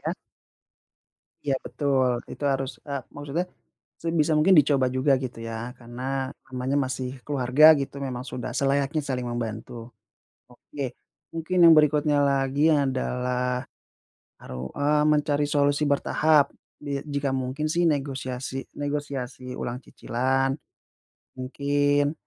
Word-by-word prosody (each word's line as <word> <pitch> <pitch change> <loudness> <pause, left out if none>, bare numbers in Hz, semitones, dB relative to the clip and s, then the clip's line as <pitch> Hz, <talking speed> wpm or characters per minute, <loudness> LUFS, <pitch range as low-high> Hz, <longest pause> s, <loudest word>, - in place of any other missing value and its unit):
ya. - - 0 1.3
Iya, 140 -2 +1
betul. 135 -3 +1 0.2
Itu 145 - -6
harus, 135 0 -2 0.2
eee, 140 -2 -3
maksudnya, 145 +5 -3 0.6
sebisa 165 -1 +1
mungkin 185 +5 +5
dicoba 140 -3 +4
juga, 130 +2 +2
gitu 125 -3 -5
ya. 115 +1 -5
Karena 130 +2 -4 0.2
namanya 130 +2 -1
masih 130 0 -3 0.2
keluarga, 135 +1 +2 0.2
gitu. 140 0 -5
Memang 130 -2 -4
sudah 125 -2 -5
selayaknya 140 +2 +1
saling 125 -3 -2
membantu. 115 0 -5 0.6
Oke, 130 +1 -6 0.4
mungkin 165 +3 -2
yang 165 -1 +9
berikutnya 150 -1 +4
lagi 140 +2 +2
adalah 125 -2 0 0.7
baru, 65 +1 -7
eee, 150 +1 +2
mencari 145 -1 +1
solusi 145 0 +2
bertahap. 145 +1 +3 0.3
Di 140 -1 -3
jika 140 -1 -1
mungkin 130 +3 -2
sih 170 +1 +2
negosiasi 135 -2 -3
negosiasi 140 -3 -4
ulang 120 +1 -4
cicilan. 135 +2 -1 0.9
Mungkin 145 +2 +1
135 Hz, 115 wpm, -25 LUFS, 125-145 Hz, 1.3 s, yang